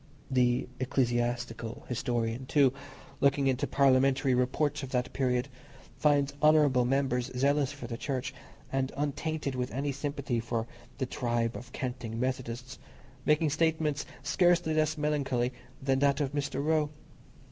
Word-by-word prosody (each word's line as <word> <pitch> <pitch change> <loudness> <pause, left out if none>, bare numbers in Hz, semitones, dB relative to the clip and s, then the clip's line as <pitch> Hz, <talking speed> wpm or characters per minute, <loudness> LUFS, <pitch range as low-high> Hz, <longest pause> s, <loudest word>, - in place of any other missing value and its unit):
The 125 -1 +2
ecclesiastical 120 -2 -1
historian, 120 0 -2
too, 135 -2 +4 0.5
looking 140 0 +3
into 135 +2 +1
parliamentary 135 -1 +3
reports 135 +4 +1
of 135 - -6
that 125 -1 -1
period, 125 -1 +1 0.5
finds 145 -2 +2
honourable 150 -5 +5
members 130 -1 +1
zealous 140 +1 +2
for 145 - -8
the 115 - -5
Church, 130 -1 -3 0.4
and 135 0 0
untainted 150 0 -2
with 125 0 -2
any 140 +3 -1
sympathy 140 -3 -2
for 115 0 -2 0.3
the 130 - -1
"tribe 120 -2 -1
of 120 0 -8
canting 125 -4 -4
Methodists," 130 0 -3 0.5
making 150 0 +3
statements 155 -1 +1 0.2
scarcely 170 +2 +3
less 155 0 +1
melancholy 140 -5 0 0.3
than 135 -1 +2
that 140 0 +3
of 140 -3 0
Mr. 140 -1 -2
Roe. 155 -1 +2
135 Hz, 135 wpm, -30 LUFS, 125-145 Hz, 0.5 s, honourable